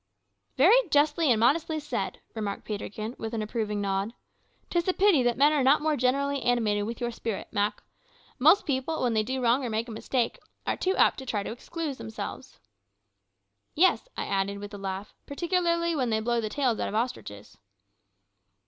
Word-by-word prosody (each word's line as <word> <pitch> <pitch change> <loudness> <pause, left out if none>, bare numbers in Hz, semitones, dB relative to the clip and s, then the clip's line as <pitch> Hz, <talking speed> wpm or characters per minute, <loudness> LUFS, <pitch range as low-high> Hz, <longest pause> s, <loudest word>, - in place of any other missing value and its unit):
"Very 410 - +5
justly 295 +1 +3
and 230 -3 +4
modestly 310 +6 +2
said," 260 -10 -4
remarked 210 -3 -4
Peterkin, 215 +1 -5
with 225 +1 -4
an 220 - -1
approving 215 -1 -2
nod. 200 +3 -1 0.6
"'Tis 345 0 0
a 370 - +3
pity 380 -8 +4
that 240 -1 +1
men 290 +3 +5
are 295 - +2
not 270 +3 +5
more 310 0 +1
generally 275 +2 +1
animated 215 -4 +1
with 230 +2 -5
your 240 -1 -2
spirit, 225 -3 -4
Mak. 205 +1 -1 0.6
Most 320 +10 +5
people, 275 +3 -1
when 245 -2 +1
they 220 - +3
do 260 +4 -3
wrong 245 +3 +3
or 245 - -2
make 220 +2 -2
a - - -7
mistake, 235 +2 -1 0.3
are - - 0
too 375 +1 0
apt - - +4
to 265 - -8
try 210 -4 -1
to - - -5
excuse 290 +4 -5
themselves." 220 +4 -7 1.2
"Yes," 370 +8 +3
I - - -2
added, 195 +1 -1
with 205 +1 -8
a 205 - -7
laugh; 195 +1 -5
"particularly 340 +1 0
when 255 -5 0
they 220 -1 +1
blow 235 +1 0
the 215 - -3
tails 255 -3 0
out - - -1
of - - -5
ostriches." 160 - -4
245 Hz, 185 wpm, -27 LUFS, 215-295 Hz, 1.2 s, Very